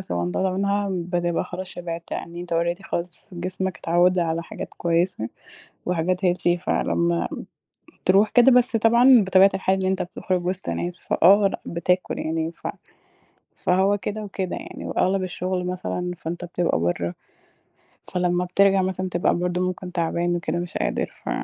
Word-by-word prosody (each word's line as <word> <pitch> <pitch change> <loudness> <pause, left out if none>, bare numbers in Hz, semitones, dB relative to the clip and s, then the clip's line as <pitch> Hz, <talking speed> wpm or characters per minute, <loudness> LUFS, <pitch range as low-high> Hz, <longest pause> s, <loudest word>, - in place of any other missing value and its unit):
صغنططة 90 - -1
منها، 200 +2 0
بتبقى 175 -1 -1
خلاص 185 +1 -6
شبعت 170 -2 -6
يعني 170 +1 -5
أنت 175 -1 -4
already، 170 +3 0
خلاص، 175 -1 -5
جسمك 185 +1 -3
اتعوَّد 175 +2 +3
على 165 -1 0
حاجات - - -8
كويسة 170 - 0 0.6
وحاجات 180 +1 0
healthy 175 0 +2
فلمَّا 85 - 0 0.8
تروح 195 +3 +5
كده 245 +4 +6
بس 250 -1 +4
طبعًا 235 +1 +6
بطبيعة 190 +1 +6
الحياة 190 0 +1
إن - - +1
أنت 190 0 0
بتخرج 180 0 -3
وسط 185 0 -3
ناس، 175 +1 -4
فآه، 200 +3 +5
لأ، - - -5
بتاكل 180 +2 -1
يعني. 160 +1 -2
ف - - -8 0.9
فهو 190 +3 +2
كده 210 +3 -4
وكده 190 -2 -4
يعني. - - -8
وأغلب 190 +1 +1
الشغل 180 0 -2
مثلًا، 180 0 -3
فأنت 170 +3 -5
بتبقى 175 - 0
برَّه، 85 +1 -1 0.9
فلمَّا 180 0 0
بترجع 195 +1 +4
مثلًا 185 0 -2
بتبقى 175 -1 +1
برضه 180 +1 -1
ممكن 185 0 -5
تعبان 170 0 0
وكده، 175 0 -2
مش 175 +2 -4
قادر، - - -1
ف - - -3
180 Hz, 150 wpm, -23 LUFS, 170-190 Hz, 0.9 s, كده